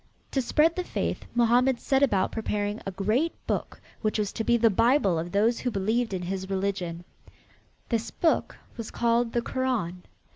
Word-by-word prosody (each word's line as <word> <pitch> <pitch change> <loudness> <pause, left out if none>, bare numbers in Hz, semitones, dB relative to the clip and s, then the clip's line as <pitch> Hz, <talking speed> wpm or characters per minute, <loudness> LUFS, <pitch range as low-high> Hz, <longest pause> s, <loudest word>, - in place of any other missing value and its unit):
To 270 - +1
spread 310 +6 +3
the 365 - -1
faith - - -3
Mohammed 240 +2 +3
set 270 0 +1
about 200 -9 +2
preparing 210 -1 -2
a - - -2
great 215 - 0
book - - -3 0.2
which 215 -1 0
was 210 -2 -1
to 225 - -3
be 235 +1 +3
the 230 -1 +4
bible 205 - +3
of 170 +2 -5
those 220 +4 +2
who 250 - -1
believed 220 +3 0
in 185 -2 -3
his 190 +1 -4
religion. 190 -3 -2 0.9
This 230 -1 -1
book 330 - 0 0.2
was 230 -2 -5
called 235 0 +1
the 235 - 0
Koran. 235 -11 -2
225 Hz, 175 wpm, -27 LUFS, 195-245 Hz, 0.9 s, the